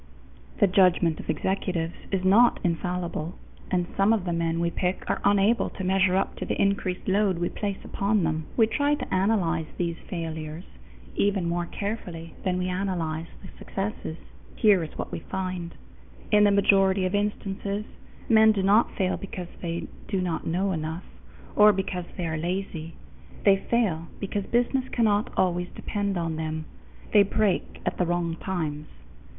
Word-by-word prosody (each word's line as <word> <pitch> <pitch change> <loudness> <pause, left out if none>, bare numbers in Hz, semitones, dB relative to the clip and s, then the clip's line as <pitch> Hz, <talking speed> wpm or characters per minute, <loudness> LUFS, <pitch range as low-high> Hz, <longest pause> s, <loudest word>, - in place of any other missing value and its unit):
The - - +7
judgment 180 -4 +3
of - - -9
executives 175 -1 -1 0.2
is 190 -2 0
not 225 +6 +6
infallible, 175 -1 -2 0.3
and 180 -2 +1
some 195 +3 +4
of 205 -5 0
the 175 - -1
men 165 0 0
we 170 0 +1
pick 180 +1 -2
are - - -1
unable 205 +3 +3
to 190 - -7
measure 190 0 +3
up 195 - 0
to - - -4
the - - -2
increased 195 -2 0
load 195 -1 +2
we 175 0 0
place 200 -2 -3
upon 200 -1 0
them. 160 -1 -1
We 225 - +6
try 285 +6 +1
to - - -5
analyze 185 -5 +1
these 170 -2 -1
failures 160 -2 -5 0.5
even 200 -3 +1
more 170 0 -1
carefully 180 -6 -5
than 185 -2 0
we 180 0 -1
analyze 175 -4 -2 0.2
the - - -10
successes. 195 -5 -4 0.4
Here 205 -6 +4
is 155 - -8
what - - -4
we - - -3
find: 185 -1 -4 0.6
in 210 -1 +6
the - - +6
majority 195 -1 +4
of 185 - -1
instances, 205 0 -2 0.4
men 220 -1 +6
do 195 -2 -1
not 205 +4 +4
fail 185 -2 0
because 185 -2 -7
they 170 -1 -3 0.2
do 195 - -1
not 180 -3 -2
know 185 +4 +1
enough, 160 +1 -3 0.5
or 210 0 +8
because 185 -2 -3
they 180 - -2
are 160 -1 -2
lazy; 170 -1 -3 0.5
they 200 -1 +6
fail 195 -7 0
because 200 0 -3
business 250 +2 +1
cannot 215 -3 +2
always 180 -1 +1
depend 200 -2 -2
upon 165 -2 -2
them 160 0 -3 0.5
they 210 - +8
break 200 -1 0
at - - -2
the 180 - +3
wrong 170 -1 0
times. 155 -6 -3
185 Hz, 165 wpm, -26 LUFS, 170-200 Hz, 0.6 s, or